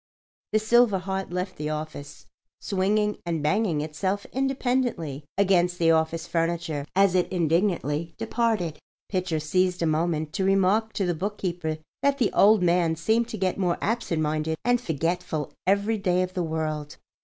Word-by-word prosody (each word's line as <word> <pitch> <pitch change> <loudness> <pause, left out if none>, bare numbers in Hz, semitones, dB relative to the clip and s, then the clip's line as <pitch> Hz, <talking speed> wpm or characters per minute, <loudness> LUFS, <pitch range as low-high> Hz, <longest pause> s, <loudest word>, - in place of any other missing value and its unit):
The 215 - +3
silver 215 -1 +4
heart 190 +1 -3
left 180 +1 -3
the 150 0 -3
office, 150 -2 -6 0.3
swinging 210 +2 0
and 165 -3 -2
banging 175 -1 +1
itself 185 +6 -2
independently 245 - -1
against 180 -3 +3
the 165 -1 +4
office 160 +1 +1
furniture 165 -3 -2
as 195 -1 +4
it 180 -1 +1
indignantly 165 -2 0
departed. 220 -8 -1 0.3
Pitcher 180 -4 -1
seized 180 +3 +1
a - - +3
moment 155 -1 0
to 190 - -1
remark 195 +3 +2
to 195 - -1
the 175 - +1
bookkeeper 175 -3 -3 0.2
that 280 0 +2
the 240 -7 +1
"old 210 -1 +5
man" 170 -2 +2
seemed 220 +8 +1
to 225 - -6
get 190 0 -1
more 180 -3 +1
absent 205 -8 -1
minded 155 +1 -1
and 245 0 +3
forgetful 165 - -2 0.2
every 200 +3 +2
day 185 -2 +2
of 185 0 -5
the 185 - -1
world. 155 -2 -3
180 Hz, 155 wpm, -26 LUFS, 160-200 Hz, 0.3 s, old